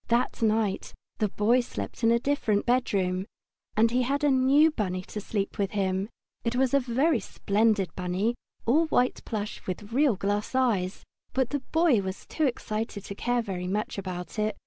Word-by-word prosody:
That 240 +1 +1
night 215 -3 0 0.2
the 215 - +2
Boy 220 +5 +3
slept 245 0 -5
in 225 - +5
a 235 - +5
different 235 -5 0
bedroom, 195 -6 +1 0.5
and 225 +1 +4
he 250 +1 +2
had 280 +4 0
a 290 - +4
new 270 +4 +5
bunny 185 -8 -2
to 210 - -6
sleep 200 -1 -3
with 200 0 0
him. 195 0 0 0.3
It 235 0 -1
was 260 0 +2
a 280 - +5 0.4
splendid 205 -2 +1
bunny, 185 +6 -1 0.3
all 310 +8 +3
white 250 -4 +1
plush 210 -2 -4
with 205 +4 -5
real 275 -3 +4
glass 205 +5 -2
eyes, 210 -8 +1 0.3
but 260 -2 +1
the 290 - 0
Boy 315 -4 +2
was 190 0 -5
too 315 - -1
excited 215 -4 -3
to - - -5
care 245 +3 0
very 180 -4 -4
much 205 +1 -2
about 185 +1 -5
it. 215 0 0
215 Hz, 175 wpm, -27 LUFS, 195-250 Hz, 0.5 s, in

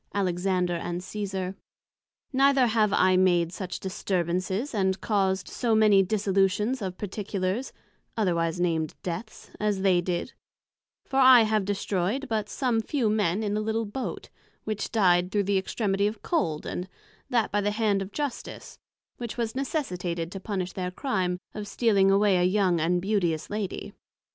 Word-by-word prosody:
Alexander 180 -1 0
and 175 +1 -3
Cesar. 190 -2 -4 0.8
Neither 270 -1 +4
have 220 -3 +2
I 185 -1 +4
made 175 -2 +3
such 185 -1 -5
disturbances, 190 - -2
and 190 -2 +1
caused 190 -3 0
so 230 -3 0
many 210 -3 +6
dissolutions 200 +4 +1
of 185 -2 -4
particulars, 200 +3 -3 0.5
otherwise 170 -4 0
named 165 -3 0
deaths, 215 +6 -6
as 205 -2 0
they 185 -3 +4
did; 175 +6 -3 0.7
for 265 - -3
I 255 -2 +9
have 215 -2 +1
destroyed 200 +5 -1
but 215 -2 -2
some 245 -4 0
few 235 -3 0
men 210 -1 +1
in 205 -1 -1
a 215 - 0
little 220 +1 -1
Boat, 255 +6 -5 0.3
which 215 -1 -3
dyed 180 -4 +3
through 205 -1 +1
the 195 0 +2
extremity 200 0 0
of 210 0 -5
cold, 160 - -1
and 180 +1 -4 0.4
that 235 -3 +1
by 205 - +1
the 205 - +1
hand 210 -2 +1
of 195 +1 -6
Justice, 290 +1 -5 0.4
which 235 -1 -6
was 230 -2 -1
necessitated 180 - -3
to 195 - -6
punish 185 -2 -3
their 180 -1 -3
crime 180 -5 -1 0.2
of 210 -1 -6
stealing 200 -4 +3
away 200 -1 +4
a 180 - +2
young 185 -2 +2
and 175 +2 +1
beauteous 180 -6 0
Lady. 210 -2 -4
195 Hz, 155 wpm, -27 LUFS, 180-220 Hz, 0.8 s, I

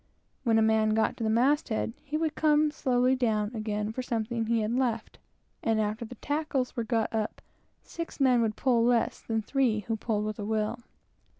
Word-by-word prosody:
When 230 -3 +3
a 220 - +4
man 220 0 +3
got 220 0 +1
to 230 - -4
the 220 - +1
mast 260 +7 +2
head, 225 0 -1
he 300 +1 -2
would 320 -1 0
come 300 -1 +3
slowly 255 -3 +2
down 220 -4 0
again 215 -2 -2
to 215 - -3
get 255 +3 -5
something 230 0 -2
which 225 - -1
he 230 -1 +2
had 215 +1 -1
forgotten; 240 -3 -1 0.4
and 225 -1 +1
after 215 +2 -1
the 245 - -10
tackles 290 -4 -2
were 235 - -1
got 225 -1 -1
up, 220 -1 -2 0.4
six 335 -2 -7
men 255 -3 +4
would 220 -2 0
pull 240 -2 +2
less 240 -1 +1
than 225 -1 -2
three 240 -3 +1
who 225 +3 -2
pulled 215 -1 -1
"with 215 0 -4
a - - -3
will." 215 +2 -1
230 Hz, 210 wpm, -28 LUFS, 220-255 Hz, 0.4 s, a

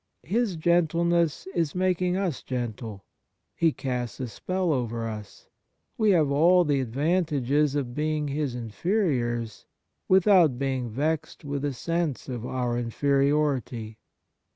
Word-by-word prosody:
His 205 - 0
gentleness 170 -2 +2
is 165 -2 -1
making 180 0 +1
us 185 -8 -2
gentle. 115 -5 -5 0.5
He 165 -1 +3
casts 125 -4 -4
a 130 - -3
spell 185 - -1
over 115 -3 -2
us. 105 -2 -8 0.5
We 220 -2 +2
have 160 -7 +4
all 175 +5 +5
the 145 -4 +1
advantages 145 +1 +1
of 130 -4 -2
being 150 +1 -1
his 140 -3 -2
inferiors 120 - -1 0.4
without 185 -7 +5
being 130 -2 -2
vexed 150 +6 -2
with 140 0 -3
a 145 -1 -1
sense 165 +1 -2
of 125 -2 -5
our 125 -2 -1
inferiority. 135 -3 0
145 Hz, 125 wpm, -26 LUFS, 125-170 Hz, 0.5 s, all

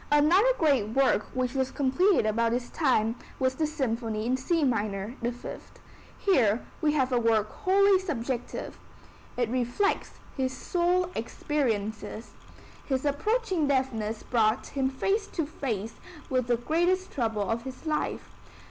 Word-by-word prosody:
Another 340 +11 +5
great 260 -9 +2
work 270 -5 +3
which 255 -1 0
was 265 -1 0
completed 285 - +2
about 230 +2 +1
this 245 0 -3
time 235 -7 +2 0.2
was 260 -1 +1
the 310 +3 0
Symphony 230 -7 -2
in 250 +2 +2
C 320 +5 0
minor 210 -4 -1
(The 240 +1 0
Fifth). 245 - -9 0.4
Here 245 - +2 0.2
we 300 -1 +2
have 265 -3 +1
a 245 - +3
work 220 -2 +2
wholly 390 +1 +4
subjective. 260 -9 -4 0.6
It 245 -2 +1
reflects 255 - 0 0.2
his 260 -1 -2
soul 360 +1 +1
experiences. 225 -4 -2 0.5
His 265 0 -1
approaching 370 - +1
deafness 230 -6 -1
brought 225 -1 +1
him 265 -1 -1
face 390 +10 0
to 325 - -2
face 230 -8 -4 0.4
with 255 -2 +1
the 240 -1 +2
greatest 345 +9 +1
trouble 225 -5 -1
of 225 +3 -1
his 260 +5 -9
life. 305 -1 -2
260 Hz, 140 wpm, -28 LUFS, 230-310 Hz, 0.6 s, Another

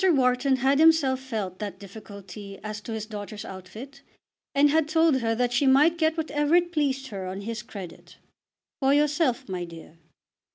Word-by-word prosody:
Wharton 260 -1 +3
had 265 +3 +2
himself 315 -5 +4
felt 215 -8 -5
that 210 -2 -5
difficulty 200 -1 -10
as 215 0 -5
to 230 - -8
his 220 -1 -4
daughter's 210 -1 -7
outfit, 220 +9 -10 0.5
and 285 +1 +5
had 320 0 +2
told 320 -2 +3
her 225 0 0
that 245 +1 0
she 270 +3 +2
might 300 +6 +5
get 320 0 +2
whatever 300 0 +1
it 350 0 +3
pleased 275 -4 -1
her 195 -3 -5
on 190 +2 -5
his 220 +1 -5
credit. 195 -6 -10 0.6
"For 275 +1 +3
yourself, 295 -3 +1
my 185 -2 -4
dear." 165 -1 -12
250 Hz, 170 wpm, -26 LUFS, 205-290 Hz, 0.6 s, and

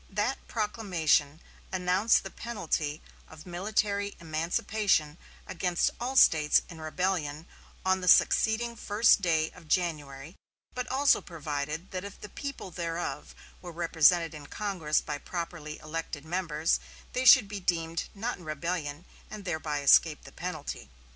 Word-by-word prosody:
That 210 +6 -2
proclamation 175 -9 0 0.3
announced 185 +4 +2
the 195 - -7
penalty 160 -9 -3 0.2
of 155 -1 -13
military 200 +2 -1
emancipation 165 0 0 0.3
against 175 0 0
all 250 +3 -3
States 155 - +5
in 165 -3 -10
rebellion 155 -2 -2 0.4
on 190 0 +2
the 180 - -4
succeeding 230 +5 +4
first 215 -1 +3
day 160 -3 +1
of 170 -3 -16
January; 150 -3 -2 0.4
but 250 0 -4
also 275 +2 +3
provided 155 0 -5
that 185 -1 -4
if 200 0 -9
the 210 - -9
people 275 -9 -6
thereof 170 0 -4 0.3
were 175 - -8
represented 165 0 +3
in 145 -2 -10
Congress 180 -7 -1
by 145 -1 -5
properly 165 -3 -5
elected 155 -1 -6
members, 165 -2 0 0.3
they 255 - 0
should 255 -4 +8
be 205 0 -5
deemed 165 -2 -1
not 230 +3 -3
in - - -13
rebellion, 155 0 -4 0.2
and 210 -2 -8
thereby 160 -4 -2
escape 150 +2 +5
the - - -12
penalty. 155 - -6
175 Hz, 135 wpm, -29 LUFS, 155-200 Hz, 0.4 s, should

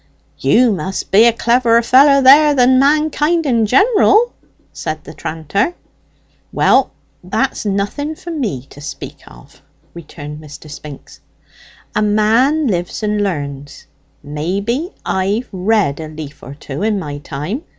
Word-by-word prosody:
"You 245 -1 +3
must 190 0 -4
be 210 +4 +6
a 235 - +6
cleverer 235 0 +2
feller, 275 +3 +5
then, 290 +3 +7
than 255 0 +4
mankind 305 +3 +2
in 230 -5 +1
jineral," 425 - +3 0.4
said 155 -1 -5
the 155 - -11
tranter. 165 - -2 0.8
"Well, - - +3 0.3
that's - - -2
nothing 205 +11 -2
for 340 - -9
me 210 - -3
to 145 - -13
speak 150 - -8
of," - - -17 0.3
returned 150 -2 -10
Mr. 150 0 -12
Spinks. 150 -2 -11 0.8
"A - - +1
man 225 +9 +2
lives 180 -2 -2
and 210 0 0
learns. 145 -6 -5 0.4
Maybe 195 - -3 0.2
I've 200 +6 -1
read 190 -5 0
a 160 - -6
leaf 155 -2 -10
or 135 - -10
two 145 +1 -7
in 215 0 0
my 145 -6 -5
time. 150 - -5
210 Hz, 135 wpm, -16 LUFS, -, 0.8 s, then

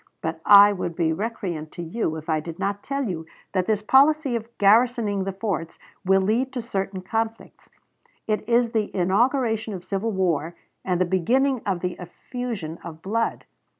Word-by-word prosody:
But 160 0 -3
I 205 0 +9
would 175 -3 -4
be 165 -2 +1
recreant 180 -6 -4
to 175 - -6
you 165 -1 -2
if 160 0 -8
I 155 -1 +1
did 165 +1 -7
not 200 0 -2
tell 275 0 -2
you 170 -8 -4 0.3
that 185 -2 0
this 215 -1 0
policy 275 +2 +4
of 230 -1 -3
garrisoning 210 -1 +3
the 195 - -2
forts 190 -5 -4 0.3
will 195 0 +4
lead 235 +7 +1
to 250 - -3
certain 195 -3 -3
conflicts; 225 +3 -4 0.6
it 215 +1 -2
is 235 0 +3
the 220 -3 0
inauguration 220 +3 +1
of 180 -1 -9
civil 200 +3 -2
war, 170 -5 0 0.3
and 180 -2 0
the 185 - +3
beginning 245 +9 +1
of 185 -3 -1
the 180 -1 -3
effusion 190 -2 -6
of 160 -1 -9
blood. 225 +4 -1
200 Hz, 175 wpm, -24 LUFS, 175-230 Hz, 0.6 s, I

